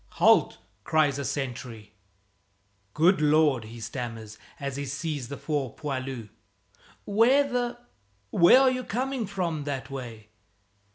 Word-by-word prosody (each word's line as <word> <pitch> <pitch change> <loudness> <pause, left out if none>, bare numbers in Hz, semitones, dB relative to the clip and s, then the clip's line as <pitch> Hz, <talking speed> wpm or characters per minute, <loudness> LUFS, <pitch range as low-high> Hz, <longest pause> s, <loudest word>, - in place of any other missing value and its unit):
"Halt!" - - +4 0.3
cries 145 -1 +2
a - - -2
sentry 125 -5 -5 1.0
"Good 170 +3 +4
Lord!" 150 -5 +3
he 115 +2 -10
stammers 115 -3 -6 0.2
as 140 -2 -4
he 140 - -3
sees 145 -1 -4
the 140 +2 -7
four 145 -6 -3
poilus. 130 -6 -5 0.8
"Where 245 +7 +4
the 245 -2 -2 0.5
where 175 +9 +7
are 265 -1 +5
you 255 0 -3
coming 250 0 -2
from, 175 -6 -2
that 135 -2 -4
way?" 115 -5 -8
145 Hz, 125 wpm, -27 LUFS, 125-185 Hz, 1.0 s, where